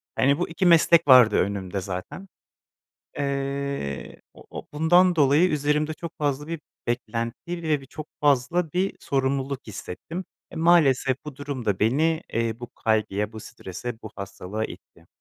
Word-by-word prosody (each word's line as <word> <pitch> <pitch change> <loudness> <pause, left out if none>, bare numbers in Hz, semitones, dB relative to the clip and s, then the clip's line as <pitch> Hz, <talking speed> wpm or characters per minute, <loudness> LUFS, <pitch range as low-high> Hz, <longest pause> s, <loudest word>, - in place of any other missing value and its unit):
hani 140 +2 +3
bu 175 - -1
2 165 +3 -1
meslek 170 -1 +6
vardı 125 -5 +8
önümde 100 -1 -1
zaten. 95 - -6 0.9
Iıı, 140 - -3 0.2
o - - -15
o - - -7
bundan 175 +4 +4
dolayı 150 +4 +5
üzerimde 150 +1 +1
çok 170 +1 -7
fazla 145 0 -1
bir 165 -2 -4 0.3
beklenti 120 +9 -3
ve 155 -3 +1
bir 135 - -13
çok 155 +2 -8
fazla 145 +4 +2
bir 190 +2 0
sorumluluk 135 0 -1
hissettim. 155 - -7 0.3
E, - - -11
maalesef 150 -6 +4
bu 145 -3 -8
durum 140 -4 -5
da 100 -3 0
beni, 155 +9 +2
ııı, 115 0 -1
bu 120 - -8
kaygıya, 105 -1 +1
bu 110 - -8
strese, 105 +3 -7
bu 110 - -8
hastalığa 100 +2 -5
itti. - - -11
140 Hz, 150 wpm, -25 LUFS, 115-160 Hz, 0.9 s, vardı